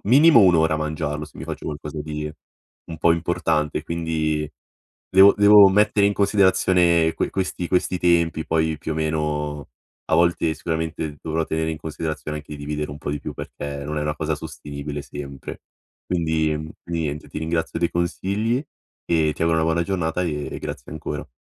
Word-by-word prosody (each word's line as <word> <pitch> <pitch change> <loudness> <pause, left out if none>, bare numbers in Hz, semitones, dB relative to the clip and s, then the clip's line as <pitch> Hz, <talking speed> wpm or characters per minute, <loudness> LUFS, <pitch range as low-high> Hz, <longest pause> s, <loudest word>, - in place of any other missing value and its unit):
minimo 140 +5 +7
1 90 -4 +6
ora 80 0 +3
a - - 0
mangiarlo, 75 -1 -3
se - - -15
mi - - -6
faccio - - -6
qualcosa 75 0 -5
di 75 0 -4 0.6
un 80 -2 -8
po' 85 +1 +4
importante; 85 -3 0
quindi 80 -2 -1 0.6
devo 95 +2 +8
devo 105 -1 +8
mettere 105 +1 +3
in 100 - +2
considerazione 95 -5 +3
que - - -1
questi 90 -2 -2
questi 90 0 +1
tempi 85 -2 +2
poi 80 -1 +1
più 80 -1 -4
o - - -4
meno, 75 -2 -2 0.4
a - - +4
volte 85 -1 +2
sicuramente 80 -2 -3
dovrò 80 0 -1
tenere 80 0 -1
in 80 - -5
considerazione 75 -1 -4
anche 75 0 -9
dividere 75 +1 -4
un 75 - -8
po' 75 - -4
di 75 - -2
più, - - -6
perché 70 0 -6
non 75 0 -3
è - - -1
una 75 0 -2
cosa 80 0 -1
sostenibile 75 -2 -6
sempre. 70 -1 -8 0.4
Quindi, 80 -3 0
mhmm, 75 +1 -7
niente, 80 -3 -3
ti - - -10
ringrazio 80 +1 -2
dei 85 0 +1
consigli 100 +6 -1 0.5
e 80 -2 +2
ti - - -4
auguro 80 -1 +3
una - - +1
buona 80 +1 +1
giornata 90 -2 -1
e 75 -4 -2
e - - -4
grazie - - -7
ancora. 80 - -5
80 Hz, 180 wpm, -23 LUFS, 75-85 Hz, 0.6 s, devo